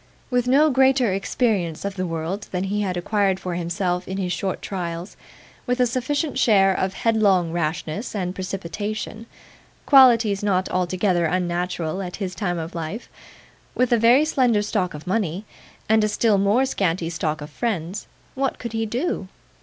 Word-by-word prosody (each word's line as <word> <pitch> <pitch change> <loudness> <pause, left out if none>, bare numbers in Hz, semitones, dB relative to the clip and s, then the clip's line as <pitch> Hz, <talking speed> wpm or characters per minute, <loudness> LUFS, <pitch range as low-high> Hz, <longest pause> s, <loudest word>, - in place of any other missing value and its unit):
With 250 0 +1
no 290 +4 +5
greater 260 -4 +3
experience 195 -4 -1
of 200 - -2
the 185 -1 -2
world 165 +5 -4
than 180 0 -1
he 205 +2 -1
had 185 -3 -2
acquired 195 +1 +1
for 180 -2 -4
himself 180 +1 -2
in 190 - -4
his 180 -2 -1
short 190 -2 -2
trials; 175 -1 -5 0.5
with 250 +1 0
a 250 - +5
sufficient 260 +4 -1
share 195 -6 +4
of 190 0 -2
headlong 200 -7 +2
rashness 165 +6 -3
and 180 -3 -2
precipitation 205 +4 -5 0.6
(qualities 235 -7 +6
not 190 -2 +1
altogether 180 0 +1
unnatural 175 0 -1
at 180 -2 -5
his 190 -3 -4
time 175 -1 -2
of 165 +1 -5
life); 170 +7 -5 0.7
with 250 0 +1
a 235 - +4
very 245 +6 +5
slender 245 -8 +2
stock 195 -5 -1
of 150 +2 -9
money, 190 -1 -1 0.4
and 220 0 +4
a - - +3
still 210 -1 +2
more 205 +7 +3
scanty 175 -8 -1
stock 155 -2 -2
of 150 0 -8
friends; 195 -2 -3 0.3
what 270 0 -1
could 235 -2 -6
he 225 0 -1
do? 240 - -2
195 Hz, 165 wpm, -23 LUFS, 180-230 Hz, 0.7 s, qualities